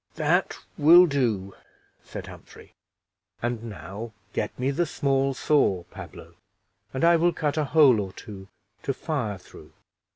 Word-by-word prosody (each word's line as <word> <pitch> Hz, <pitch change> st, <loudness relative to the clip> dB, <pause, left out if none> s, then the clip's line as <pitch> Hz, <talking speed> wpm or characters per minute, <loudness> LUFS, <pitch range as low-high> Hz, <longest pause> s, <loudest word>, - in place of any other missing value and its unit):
"That -, -, +1 dB, 0.2 s
will 170 Hz, +4 st, +8 dB
do," 115 Hz, -, -1 dB, 0.5 s
said -, -, -8 dB
Humphrey; -, -, -14 dB, 0.7 s
"and 120 Hz, -1 st, -2 dB
now 110 Hz, +1 st, -8 dB, 0.2 s
get -, -, -1 dB
me 130 Hz, +2 st, 0 dB
the 170 Hz, +4 st, 0 dB
small 135 Hz, -2 st, 0 dB
saw, 115 Hz, -, +2 dB
Pablo, 85 Hz, -, -11 dB, 0.6 s
and 130 Hz, -, -3 dB
I 170 Hz, 0 st, +6 dB
will 175 Hz, +2 st, +3 dB
cut 150 Hz, -3 st, -2 dB
a 155 Hz, -2 st, 0 dB
hole 140 Hz, -6 st, +5 dB
or 95 Hz, -2 st, -4 dB
two 95 Hz, -1 st, -11 dB, 0.3 s
to 135 Hz, -, -3 dB
fire 125 Hz, -, -3 dB
through." 90 Hz, -, -16 dB
130 Hz, 140 wpm, -25 LUFS, 105-150 Hz, 0.7 s, will